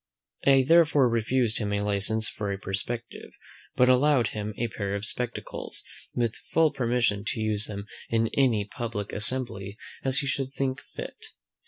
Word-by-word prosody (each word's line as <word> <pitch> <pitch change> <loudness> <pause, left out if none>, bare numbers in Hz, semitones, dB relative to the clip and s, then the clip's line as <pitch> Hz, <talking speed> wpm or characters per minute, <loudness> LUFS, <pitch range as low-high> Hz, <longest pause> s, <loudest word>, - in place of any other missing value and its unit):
I 135 -1 +6
therefore 160 -5 +6
refused 115 0 +1
him 105 -2 -2
a 100 - 0
license 105 +2 0
for 105 -2 -4
a 100 - -2
perspective, 100 +5 -4 0.5
but 125 - +5
allowed 130 -2 +4
him 105 -1 -5
a 120 - 0
pair 100 -2 -3
of 100 +1 -4
spectacles, 125 +2 -5 0.3
with 120 -2 0
full 160 -1 +4
permission 120 -6 +1
to 110 - -2
use 110 -1 0
them 100 -1 -6 0.2
in 115 -1 +2
any 120 -7 +3
public 105 -1 -5
assembly 105 -3 +2 0.3
as 135 0 +1
he 145 - +1
should 135 -1 -2
think 135 0 -2
fit. - - -7
115 Hz, 160 wpm, -27 LUFS, 105-130 Hz, 0.5 s, I